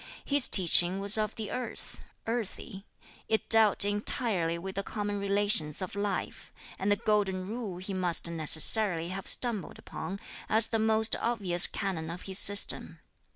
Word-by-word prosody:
His 285 -2 +4
teaching 180 0 +4
was 200 +2 +6
of 215 -1 +3
the 220 -2 -7
earth, 250 - -7 0.2
earthy; 220 -3 -7 0.4
it 220 - -2
dealt 220 -3 +3
entirely 205 -4 -2
with 190 +3 -8
the 195 - -4
common 205 0 -6
relations 200 -6 0
of 185 +1 -7
life, 200 -2 -6 0.3
and 195 +2 -2
the - - +3
Golden 195 -3 -2
Rule 215 -4 -7
he 190 +2 -8
must 180 -3 0
necessarily 170 +2 +3
have 190 +1 -7
stumbled 235 -6 -3
upon, 195 +2 -9 0.3
as 220 0 +2
the 225 - -3
most 220 0 +3
obvious 195 -7 +2
canon 180 -6 -6
of 175 +2 -9
his 190 0 +2
system. 205 0 +3
200 Hz, 155 wpm, -27 LUFS, 185-215 Hz, 0.4 s, was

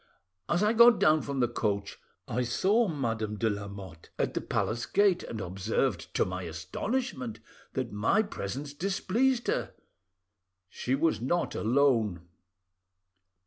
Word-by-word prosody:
As 175 +4 +2
I 210 +2 +3
got 235 0 +7
down 155 0 +4
from 140 -2 -2
the 120 - +3
coach 100 -4 -2 0.3
I 125 - -1
saw 205 - +2
Madame 115 - -2
de 110 +1 +1
Lamotte 100 -4 -8
at - - 0
the - - -2
palace 120 +1 -1
gate, 200 -3 +3
and 110 - -6
observed, 95 +1 -1
to - - +3
my 90 0 -4
astonishment, 230 - -3 0.3
that 130 -3 -2
my 115 - +2
presence 140 - -5
displeased 220 - 0
her. - - -1 0.9
She 125 +5 -1
was 145 -7 +1
not 170 +8 0
alone." 110 -8 +1
125 Hz, 135 wpm, -29 LUFS, -, 0.9 s, got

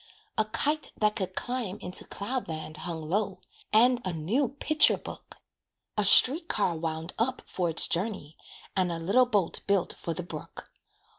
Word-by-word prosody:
A 220 - +1
kite 295 +8 -1
that 210 -1 +1
could 185 -2 -3
climb 245 -6 -3
into 180 -3 +4
cloud 250 +6 -4
land 155 -1 -6
Hung 160 0 -5
low, 195 +1 -1 0.3
and 245 +3 +4
a 185 - -2
new 190 - 0
picture 300 +2 +4
book; - - -11 0.6
A 210 - +1
street 295 - +6
car 185 -5 +1
"wound 160 +1 -4
up" 255 +3 -1
for 180 -2 -2
its 165 - +3
journey, 175 -5 -2 0.4
And 185 -2 +1
a 170 - -2
little 200 +10 +2
boat 205 -8 +1
built 200 -3 +1
for 165 - -5
the 180 - -5
brook. 160 -3 -10
195 Hz, 165 wpm, -28 LUFS, 170-240 Hz, 0.6 s, street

